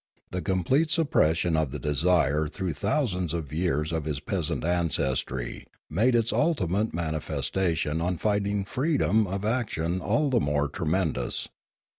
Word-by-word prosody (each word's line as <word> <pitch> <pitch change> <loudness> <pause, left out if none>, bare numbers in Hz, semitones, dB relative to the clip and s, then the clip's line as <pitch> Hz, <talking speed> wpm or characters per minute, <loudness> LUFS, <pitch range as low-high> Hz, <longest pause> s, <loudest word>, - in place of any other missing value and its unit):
The 90 - -2
complete 105 - +1
suppression 85 - +2
of 80 -3 +1
the 70 - -5
desire 75 +1 +2
through 90 +2 -3
thousands 90 - 0
of 75 -4 -5
years 80 -2 0
of 80 -3 -2
his 75 -3 -2
peasant 85 -1 -2
ancestry 70 -7 -1 0.2
made 115 +10 +3
its 115 -1 +2
ultimate 110 - +1
man 80 -1 -2
ifestation 80 0 -1
on 90 +1 0
finding 100 -1 0
freedom 110 - +1
of 100 +2 -3
action 95 -7 -1
all 135 - +1
the 120 - +4
more 75 -4 +1
tremendous. 80 -4 -1
90 Hz, 140 wpm, -27 LUFS, 75-105 Hz, 0.2 s, the